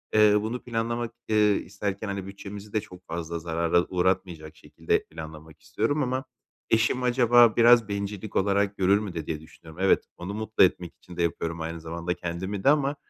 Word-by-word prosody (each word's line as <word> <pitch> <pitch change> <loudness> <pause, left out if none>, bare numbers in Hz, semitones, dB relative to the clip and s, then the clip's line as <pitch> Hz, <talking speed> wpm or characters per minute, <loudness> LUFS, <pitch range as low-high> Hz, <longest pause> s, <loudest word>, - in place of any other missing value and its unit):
Iıı, 105 -1 +5
bunu 115 +4 -4
planlamak, 115 0 -2 0.2
ııı, 110 - +4 0.2
isterken, 100 +1 -4
hani, 100 -1 -4
bütçemizi 100 +1 -9
de 110 - +1
çok 90 0 -14
fazla 85 0 -4
zarara 85 +1 +1
uğratmayacak 90 -4 -1
şekilde - - -2
planlamak 80 0 -11
istiyorum 145 - -1
ama 130 +1 -1 0.5
eşim 115 +3 +2
acaba 120 -2 +5
biraz 120 -1 +6
bencillik 100 0 -5
olarak 100 0 +1
görür 100 +2 +4
mü 100 -4 -5
de 80 -3 -5
diye 75 0 -4
düşünüyorum. 80 +1 -15
Evet, 95 - +4
onu 90 +3 -6
mutlu 110 0 +2
etmek 90 -1 0
için 90 -1 -14
de 85 - +1
yapıyorum, 85 0 -2
aynı 80 0 -5
zamanda 85 +2 -3
kendimi 95 +4 -5
de - - +5
ama, 145 -1 +2
100 Hz, 175 wpm, -26 LUFS, 85-110 Hz, 0.5 s, biraz